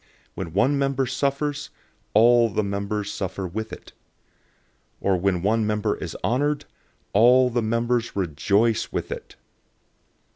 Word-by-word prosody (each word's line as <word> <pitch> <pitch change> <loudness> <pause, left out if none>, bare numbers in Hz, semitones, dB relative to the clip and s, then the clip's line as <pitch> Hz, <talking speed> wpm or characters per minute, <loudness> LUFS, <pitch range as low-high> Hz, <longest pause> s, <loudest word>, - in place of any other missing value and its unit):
012:026 - - -33 0.3
When 85 -4 -6
one 135 +9 +2
member 135 -1 +1
suffers, 140 +3 -2 0.5
all 120 +1 +6
the 110 +1 -1
members 100 +1 -3
suffer 95 0 -4
with 110 +5 -5
it. - - -11 1.1
Or 100 -1 +1
when 90 -1 0
one 110 +1 +2
member 105 0 0
is 85 -4 -6
honored, 145 +4 0 0.5
all 125 +4 +5
the 120 0 0
members 115 +1 0
rejoice 100 +6 +1
with - - -4
it. - - -7
110 Hz, 135 wpm, -24 LUFS, 100-125 Hz, 1.1 s, all